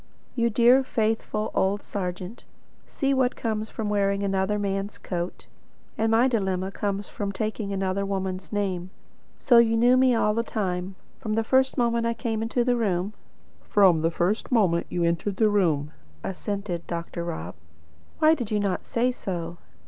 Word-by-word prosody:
"You 235 -2 +1
dear 240 +4 +5
faithful 220 -3 -1
old 200 +2 +1
serjeant! 185 +2 -5 0.4
See 275 -1 0
what 260 -2 +2
comes 220 -1 -2
of 220 - -4
wearing 200 -1 +1
another 195 +1 0
man's 200 0 -2
coat. 175 -1 -5 0.5
And 225 +1 +1
my 230 +3 +4
dilemma 190 -5 -1
comes 200 0 -3
from 200 -1 -4
taking 215 +1 -3
another 195 0 -1
woman's 190 -1 -3
name. 190 -4 -2 0.5
So 240 -2 +5
you 225 -1 +4
knew 245 +2 +5
me 255 -1 +4
all 210 -2 +2
the 230 - +1
time, 190 -4 -3 0.2
from 215 -1 -2
the 225 - +1
first 265 +4 +2
moment 235 -1 +1
I 230 - -1
came 225 -2 -2
into 235 +2 0
the 245 0 +2
room?" 200 -3 0 0.5
"From 185 -6 +4
the 165 - +2
first 180 +9 -1
moment 185 -8 +2
you 175 - -1
entered 170 +4 0
the 220 -2 +4
room," 155 -8 +1 0.3
assented 190 -2 -4
Dr. 170 0 -4
Rob. 90 - -5 0.6
"Why 315 0 +5
did 245 -9 -3
you 210 - +1
not 200 -3 -1
say 245 +2 +1
so?" 175 -7 -5
205 Hz, 165 wpm, -25 LUFS, 185-230 Hz, 0.6 s, dear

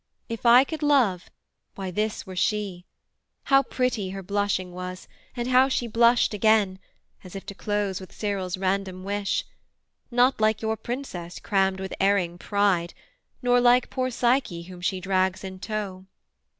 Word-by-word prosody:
If 230 +1 -2
I 245 +2 +8
could 315 +3 -6
love, 255 - +2 0.5
why 190 -2 -5
this 215 +3 -2
were 185 - -8
she: 190 -2 -1 0.6
how 275 0 +5
pretty 250 -7 -1
Her 195 0 -6
blushing 200 -1 -1
was, 180 +1 -7 0.3
and 240 0 -2
how 255 +1 +5
she 255 - 0
blushed 235 +1 +3
again, 210 -2 +3 0.4
As 185 0 -11
if 195 - -7
to - - -7
close 205 -2 -2
with 190 - -11
Cyril's 195 -4 -3
random 185 -1 -2
wish: 200 0 -1 0.6
Not 245 -1 +3
like 215 0 +3
your 220 0 0
Princess 220 -7 -6
crammed 190 -1 +1
with 190 0 -5
erring 190 -3 +1
pride, 200 -5 +1 0.5
Nor 245 0 +4
like 245 0 +4
poor 255 -1 -1
Psyche 240 -8 0
whom 180 0 -11
she 185 +1 -1
drags 190 0 0
in 190 -1 -7
tow.' 195 -3 -5
200 Hz, 155 wpm, -25 LUFS, 185-235 Hz, 0.6 s, I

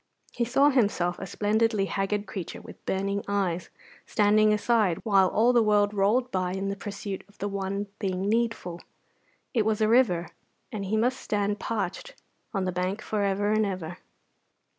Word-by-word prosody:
He 235 - 0
saw 275 +5 +4
himself 200 -8 +1
a 195 - -5
splendidly 215 +1 +1
haggard 200 +1 -1
creature 190 -3 -6
with - - -13
burning 200 +1 -1
eyes 190 -4 -1 0.4
standing 215 0 +4
aside 210 -4 +2
while 195 -4 +4
all 230 +6 +3
the 240 - +5
world 210 -1 +3
rolled 220 +6 +2
by 185 -1 -1
in 195 +1 -2
pursuit 200 -1 -6
of 205 - -23
the 205 - -3
one 200 0 -3
thing 190 -1 -2
needful. 220 -6 -1 0.7
It 225 - +3
was 215 0 0
a 215 - +3
river, 210 -8 +3 0.4
and 200 -2 -4
he 215 +3 0
must 250 +4 +1
stand 205 0 -1
parched 225 - -3 0.4
on 195 -4 -1
the 185 - 0
bank 185 +4 -2
for 215 -1 -2
ever 200 +1 +1
and 215 0 +3
ever. 185 -3 -4
205 Hz, 165 wpm, -27 LUFS, 195-220 Hz, 0.7 s, the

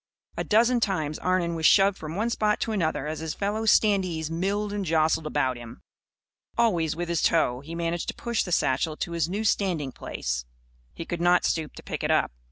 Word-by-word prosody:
A - - -2
dozen 235 +3 +3
times, 160 -9 -1
Arnon 180 -2 0
was 160 -2 +3
shoved 195 0 +5
from 160 -3 -7
one 225 +4 0
spot 210 -2 +1
to 225 - -1
another 165 -9 -1
as 155 +1 -4
his 160 -1 -4
fellow 210 +2 -2
standees 185 -8 +2
milled 200 +5 -1
and 205 -1 -2
jostled 160 -2 +1
about 130 -4 0
him. 120 -1 -11 0.7
Always, 175 -10 +2
with 175 +1 -3
his 170 -1 0
toe, 125 -7 +2
he 160 +5 -8
managed 170 0 -2
to - - -3
push 235 -2 -1
the 180 - -4
satchel 155 +1 +1
to 170 - -4
his 170 -1 -1
new 205 +4 -2
standing 180 -10 0
place. - - -4 0.5
He 165 - -7
could 170 0 -4
not 175 +1 +4
stoop 160 -2 -1
to - - -11
pick - - -5
it - - 0
up. - - +2
170 Hz, 205 wpm, -26 LUFS, 155-200 Hz, 0.7 s, shoved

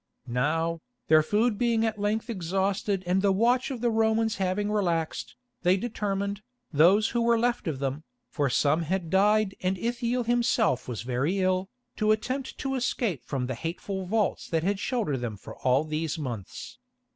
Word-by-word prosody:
Now, 160 +7 0 0.3
their 155 0 +7
food 210 +6 +1
being 230 -2 +2
at 220 -2 -2
length 215 +2 0
exhausted 195 0 -1
and 180 +2 +2
the 200 0 +3
watch 240 +7 +2
of 255 -4 -5
the 240 -1 +2
Romans 220 0 +2
having 195 +2 0
relaxed, 170 -6 -1 0.3
they 185 +1 +4
determined, 200 -2 -2 0.3
those 185 +9 +5
who 235 - 0
were 235 0 +3
left 240 -2 0
of 155 -4 -1
them, 135 +3 -3 0.2
for 145 -4 -1
some 145 +6 +2
had 170 0 -2
died 210 +1 +3
and 185 +1 0
Ithiel 240 +3 -1
himself 235 - +1
was 120 -3 -4
very 130 +9 0
ill, 185 0 +1 0.3
to 215 -1 +3
attempt 255 +5 -2
to 270 -1 -2
escape 235 - -1
from 130 0 -3
the 130 - -3
hateful 180 - -4
vaults 215 +1 0
that 160 -2 0
had 195 +2 0
sheltered 220 - -1
them 120 -4 -4
for - - -10
all 130 +3 +2
these 155 +1 -2
months. 120 - -6
195 Hz, 170 wpm, -27 LUFS, 160-225 Hz, 0.3 s, their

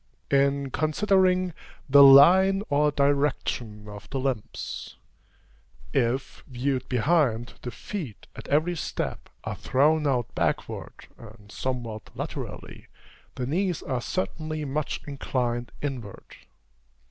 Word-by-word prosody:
In 140 0 +2
considering 185 +3 +2 0.3
the 140 0 +7
line 180 +9 +8
or 150 +1 +3
direction 140 -7 0
of 105 -1 -10
the 135 - -2
limbs 130 -5 -4 1.0
if, 130 0 -1
viewed 130 0 -2
behind, 125 -3 +1
the 125 - -5
feet, 145 - -7
at - - -9
every 155 +5 +2
step, 160 - -4
are - - -4
thrown 150 +3 +2
out 125 -4 0
backward, - - -3
and 105 -2 -14
somewhat 120 -5 -4
laterally, - - -7 0.5
the 125 - -3
knees 175 +5 -1
are 130 -3 -2
certainly 155 -1 -3
much 145 +2 -2
inclined 125 -4 -2
inward. 125 -8 -6
140 Hz, 110 wpm, -26 LUFS, 120-155 Hz, 1.0 s, line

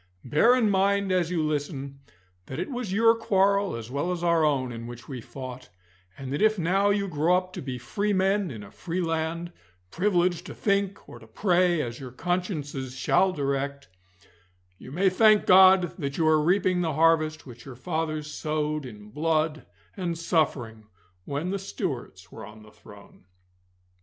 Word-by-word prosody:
Bear 155 - +4
in 245 -4 +2
mind 200 0 +2
as 180 -3 +1
you 170 -3 0
listen 145 -2 -3 0.5
that 130 - -6
it 180 - -4
was 245 -6 -4
your 225 +3 +5
quarrel 200 - +1
as 115 +1 -8
well 145 +6 -1
as 175 -1 -4
our 170 -2 +3
own 135 -4 +1
in 115 0 -7
which 120 0 -10
we 130 -4 -6
fought, 130 +1 -9 0.5
and 135 -1 -6
that 145 - -2
if 215 0 +4
now 190 +4 +2
you 200 -1 +1
grow 170 +1 +2
up 185 0 -5
to - - -6
be 130 -2 -5
free 200 - -2
men 195 0 +1
in 110 -6 -8
a 100 - -13
free 175 +1 -5
land, 165 0 -2 0.4
privileged 180 -2 +1
to - - -8
think 200 -1 -1
or - - -11
to - - -16
pray 180 -4 +2
as 120 -1 -6
your 130 -2 -7
consciences 145 - -3
shall 190 +7 +2
direct, 140 -2 -3 0.9
you - - -11
may 185 +7 +1
thank 215 +3 +5
God 185 -1 +6
that 140 -3 -3
you 165 - +1
are 155 -1 +4
reaping 180 +1 +2
the 160 -3 -1
harvest 155 0 +2
which 120 -2 -12
your 135 -3 -9
fathers 155 +2 -3
sowed 150 -1 -3
in 105 -3 -12
blood 155 +1 -1 0.3
and 175 -4 -3
suffering 130 - -1 0.4
when 145 +6 -3
the 200 - -2
Stuarts 130 - -5
were 110 - -10
on 105 +2 -12
the 105 - -16
throne. 100 -3 -17
160 Hz, 175 wpm, -26 LUFS, 135-185 Hz, 0.9 s, God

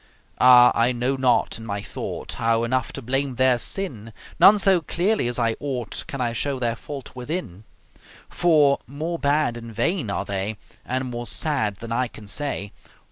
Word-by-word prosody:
Ah! 125 -1 +8
I 115 +2 +2
know 125 +3 0
not 130 -3 +1
in 115 - -9
my 100 -1 -3
thought - - -6
How 115 0 +1
enough 130 +1 -1
to 135 - -7
blame 135 +2 -1
their 130 -1 +3
sin, 115 - -4 0.3
None 195 +5 +8
so 195 -3 +4
clearly 180 - 0
as 120 - -1
I 115 -2 +1
ought 130 -6 -4
Can 140 -5 -6
I 120 -2 -1
show 140 +4 -2
their 120 -2 -1
fault 135 +1 -9
within; 125 - -5 0.6
For, 150 -5 +3
more 160 +5 -4
bad 145 -4 +1
and 115 -1 -9
vain 145 - 0
are - - -2
they 100 +2 -3 0.3
And 130 0 -3
more 120 0 -5
sad 135 -10 -1
than 115 +4 -9
I 125 +2 0
can 110 -2 -13
say. 105 -3 -2
125 Hz, 180 wpm, -23 LUFS, 115-145 Hz, 0.6 s, Ah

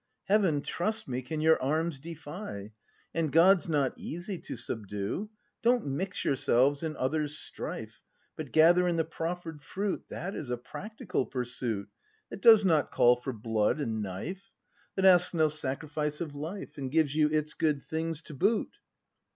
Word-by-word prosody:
Heaven, 190 -8 +2
trust 215 +6 -2
me, 130 -1 -2
can 155 +5 -4
your 160 0 +4
arms 155 +2 0
defy. 150 - -7 0.4
And 165 -3 0
God's 175 +3 +5
not 145 -4 +1
easy 175 +3 -5
to - - -7
subdue. 105 - -4 0.3
Don't 240 0 +3
mix 175 +8 -2
yourselves 140 0 +3
in 160 -2 -3
others' 150 +2 -1
strife. - - -6 0.3
But - - -6
gather 175 +3 +6
in 175 - +1
the 165 -1 +1
proffer'd 165 -1 -5
fruit. 195 +7 -3
That 195 +3 -5
is 140 - -5
a 125 - -1
practical 190 - -4
pursuit. 120 -5 -3 0.4
That - - -7
does 220 -3 +8
not 160 -5 +3
call 120 +1 +5
for 125 +2 -4
blood 110 +2 0
and 115 -6 -2
knife; 105 - -5 0.5
That 190 - +1
asks 180 -1 +6
no 155 -2 +4
sacrifice 150 +1 -2
of 160 -4 -4
life. 155 +3 -6
And 135 -2 -3
gives 150 -1 +2
you 150 0 +3
its 150 0 0
good 150 -3 0
things 160 0 -3
to - - -10
boot! 210 - +1
155 Hz, 160 wpm, -30 LUFS, 135-175 Hz, 0.5 s, does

